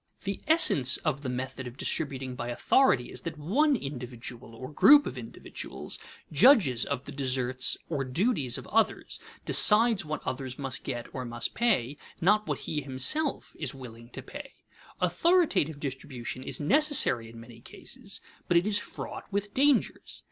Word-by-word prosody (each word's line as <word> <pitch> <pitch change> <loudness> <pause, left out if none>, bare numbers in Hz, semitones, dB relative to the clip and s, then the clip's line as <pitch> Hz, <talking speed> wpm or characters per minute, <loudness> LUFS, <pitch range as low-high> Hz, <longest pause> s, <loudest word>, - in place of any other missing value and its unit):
The 200 0 -4
essence 155 - +6
of 135 - -2
the 135 - -4
method 130 0 -5
of 125 +2 -11
distributing 135 -4 -2
by 120 -1 -6
authority 125 - +2
is - - -6
that 165 -2 -6
one 270 - +2
individual 125 - -8
(or 130 +5 -9
group 290 - +6
of - - -5
individuals) - - -7 0.3
judges 185 - +5
of 140 -2 -3
the - - -8
deserts 130 -2 0
or 145 -5 -2
duties 140 - 0
of - - -9
others, 225 +1 0 0.3
decides 225 0 +5
what 155 -1 -6
others 130 0 -5
must 135 -3 -3
get 120 -3 -4
or 130 - -5
must 120 -1 -2
pay, 165 - 0 0.2
not 210 +4 +2
what - - -3
he 150 -2 -3
himself 140 - -1
is 145 -4 -3
willing 120 -3 -11
to 130 +1 -9
pay. 285 - -10 0.5
Authoritative 295 - +1
distribution 130 -3 -6
is - - -5
necessary 155 - +3
in 115 0 -12
many 115 0 -13
cases, 210 - -8 0.3
but 175 - +3
it 170 - +2
is 210 -1 +2
fraught 220 - -9
with 200 +1 -3
dangers. 280 -1 +1
140 Hz, 160 wpm, -28 LUFS, 125-210 Hz, 0.5 s, essence